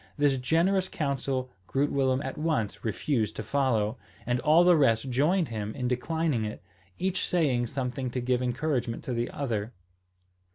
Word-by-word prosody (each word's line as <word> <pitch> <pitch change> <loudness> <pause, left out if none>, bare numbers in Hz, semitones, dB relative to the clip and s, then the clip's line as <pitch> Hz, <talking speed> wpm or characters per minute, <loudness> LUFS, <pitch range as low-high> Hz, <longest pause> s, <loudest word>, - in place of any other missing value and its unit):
This 145 -2 +3
generous 180 +8 +2
counsel 135 -3 -2 0.2
Groot 140 +2 0
Willem 135 -1 +1
at 135 - -4
once 150 -10 -1
refused 110 0 -1
to - - -4
follow, 125 -5 0 0.3
and 125 +1 0
all 155 +7 +5
the 180 0 +6
rest 130 -4 +2
joined 155 +5 +2
him 110 -2 -4
in 125 -3 -2
declining 135 0 0
it, 105 -1 -5 0.3
each 190 0 -1
saying 135 -9 +1
something 130 0 -3
to 125 - -3
give 125 0 0
encouragement 125 -2 -1
to 130 - -3
the 120 0 -1
other. 115 -5 -3
130 Hz, 160 wpm, -28 LUFS, 120-150 Hz, 0.3 s, the